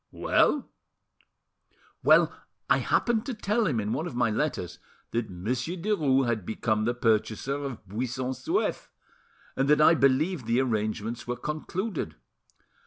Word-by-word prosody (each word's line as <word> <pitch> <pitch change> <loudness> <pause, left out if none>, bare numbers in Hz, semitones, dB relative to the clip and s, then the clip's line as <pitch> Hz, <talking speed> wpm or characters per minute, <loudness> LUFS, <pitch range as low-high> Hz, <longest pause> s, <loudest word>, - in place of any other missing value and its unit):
Well?" 290 - +2 1.3
"Well, - - +5 0.3
I - - +4
happened 230 -3 +1
to 260 - -3
tell 215 +1 0
him 130 -8 0
in 105 +1 -1
one 165 - -2
of 165 - -7
my 120 -3 +2
letters 105 - -2 0.3
that 115 -2 -1
Monsieur 120 - -3
Derues 155 -9 +2
had 115 -4 -1
become 110 +2 -1
the 120 +1 0
purchaser 120 +4 0
of 125 -7 -6
Buisson 125 +5 -3
Souef, 330 - -1 0.7
and 135 +1 +1
that 150 0 +5
I 155 +2 +7
believed 140 0 +2
the 115 +2 +2
arrangements 115 -1 -2
were 125 0 -2
concluded. 155 - -4
130 Hz, 140 wpm, -27 LUFS, 110-155 Hz, 1.3 s, I